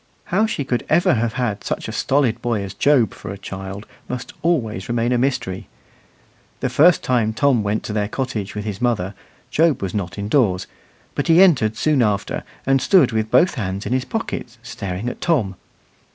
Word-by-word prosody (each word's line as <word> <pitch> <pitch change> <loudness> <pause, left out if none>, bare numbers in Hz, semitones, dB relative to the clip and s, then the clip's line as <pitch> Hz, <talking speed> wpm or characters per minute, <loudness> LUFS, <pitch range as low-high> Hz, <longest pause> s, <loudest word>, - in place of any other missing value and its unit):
How 215 +4 +3
she 150 - -2
could 125 -2 -1
ever 170 0 +4
have 115 -1 0
had 115 -4 -2
such - - -3
a - - -4
stolid 130 -5 +1
boy 115 -4 -1
as 95 0 -6
Job 125 -2 +3
for - - -9
a 100 - -5
child 95 +1 -7 0.2
must 125 0 -5
always 115 - -1
remain 120 0 0
a 125 - +3
mystery. 125 -8 -1 0.9
The 125 - -2
first 155 +7 +5
time 115 -4 +1
Tom 130 0 +3
went 105 +1 -1
to 105 - -5
their 105 -1 0
cottage 110 -5 -4
with 105 0 -4
his 105 -1 -5
mother, 105 -6 0 0.4
Job 160 -1 +3
was 95 -2 -4
not 90 -4 -3
indoors; 100 -3 +1 0.5
but - - -2
he 165 +1 +6
entered 115 - +3
soon 150 -4 +2
after, 105 -3 0 0.2
and 135 0 +3
stood 150 -4 +4
with 110 -1 -1
both 175 +6 +4
hands 100 -6 -4
in 110 - -1
his 130 0 0
pockets, 225 - -4
staring 100 -3 -5
at - - -5
Tom. 115 - +1
120 Hz, 190 wpm, -21 LUFS, 100-135 Hz, 0.9 s, he